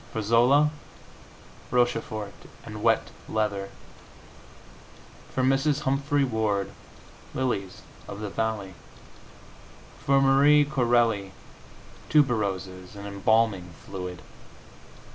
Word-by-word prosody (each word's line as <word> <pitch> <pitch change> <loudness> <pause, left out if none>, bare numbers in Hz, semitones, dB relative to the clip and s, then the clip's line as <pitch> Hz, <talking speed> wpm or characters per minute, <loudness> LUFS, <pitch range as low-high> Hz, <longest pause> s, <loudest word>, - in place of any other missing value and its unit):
For 110 - -3
Zola, 125 +7 +4 1.0
Rochefort 115 -4 0 0.3
and 105 -2 -7
wet 115 0 +2 0.2
leather. 105 -3 -1 1.6
For 130 - -1
Mrs. 135 +3 +2
Humphrey 140 +1 +1
Ward, 110 -5 0 0.6
lilies 100 -8 -2 0.2
of 100 - -7
the 105 -2 -5
valley. 110 -4 -2 1.3
For 140 0 +4
Marie 140 +2 +5
Corelli, 120 -8 +1 0.8
tuberoses 100 -10 0
and 100 0 -8
embalming 100 -2 +1
fluid. 90 -2 -7
110 Hz, 85 wpm, -26 LUFS, 100-135 Hz, 1.6 s, Marie